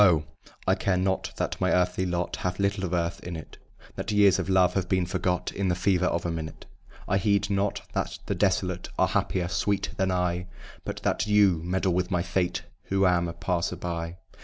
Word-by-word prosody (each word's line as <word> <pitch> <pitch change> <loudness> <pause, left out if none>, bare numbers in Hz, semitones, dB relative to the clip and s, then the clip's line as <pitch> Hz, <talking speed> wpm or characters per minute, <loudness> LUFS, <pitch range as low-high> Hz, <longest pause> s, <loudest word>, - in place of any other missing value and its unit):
I - - +4
care 95 -2 +1
not 95 +1 0
that - - -2
my - - +3
earthly 90 +1 +2
lot 90 0 -2
Hath 90 0 -2
little 100 0 0
of 90 - -4
Earth 85 -1 0
in 90 -1 -5
it, 80 - -9 0.4
That 100 - -3
years 100 -3 +5
of - - -2
love 90 -2 +4
have 95 -1 -1
been 95 -2 +2
forgot 90 0 -1
In 100 -1 -1
the 90 - +2
fever 90 0 +2
of 85 -1 -1
a 85 - 0
minute: 80 -1 -6 0.4
I 100 - +2
heed 100 0 +2
not 100 +1 0
that - - -2
the - - -1
desolate - - 0
Are - - +3
happier, 90 -2 0
sweet, 100 +2 0
than 95 -1 +1
I, 90 0 0 0.4
But - - -5
that - - +1
you 100 -5 +4
meddle 95 +1 0
with 90 0 0
my 90 -2 +1
fate 90 0 -1 0.2
Who 95 0 +2
am 90 -1 +3
a 85 - -4
passer 90 +1 -1
by. 85 -1 -4
90 Hz, 205 wpm, -27 LUFS, 90-95 Hz, 0.4 s, years